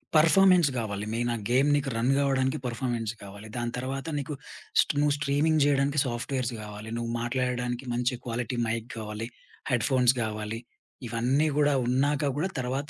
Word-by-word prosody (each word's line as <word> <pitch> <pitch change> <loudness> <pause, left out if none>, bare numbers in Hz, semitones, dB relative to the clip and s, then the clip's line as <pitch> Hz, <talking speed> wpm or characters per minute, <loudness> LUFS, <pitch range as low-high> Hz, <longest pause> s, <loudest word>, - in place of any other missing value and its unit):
Performance 175 0 +6
గావాలి 105 -3 -3
main. 120 +1 0
ఆ - - -3
game 135 +4 +4
నీకు 140 -1 0
రన్ 125 +4 +2
కావడానికి 135 -1 +1
పెర్‌ఫార్మెన్స్ 120 -2 -2
గావాలి. 100 +2 -10
దాని 120 0 -2
తర్వాత 135 +3 -3
నీకు 145 +2 -4 0.5
స్టు - - 0
నువ్వు 145 -1 +3
స్ట్రీమింగ్ 150 +2 +2
చేయడానికి 140 0 +2
సాఫ్ట్‌వేర్స్ 125 +1 -2
గావాలి, 105 +1 -8
నువ్వు 115 0 -3
మాట్లాడడానికి 125 0 -1
మంచి 125 +1 +1
క్వాలిటీ 120 +1 -3
మైక్ 115 +1 -2
గావాలి 110 0 -5 0.4
హెడ్‌ఫోన్స్ 125 0 +3
గావాలి. 110 0 -3 0.5
ఇవన్నీ 125 +7 +1
గూడా 145 -1 +4
ఉన్నాక 140 +3 +2
గూడా 185 +5 0
తర్వాత 135 +4 -2
125 Hz, 150 wpm, -28 LUFS, 115-140 Hz, 0.5 s, పెర్‌ఫార్మెన్స్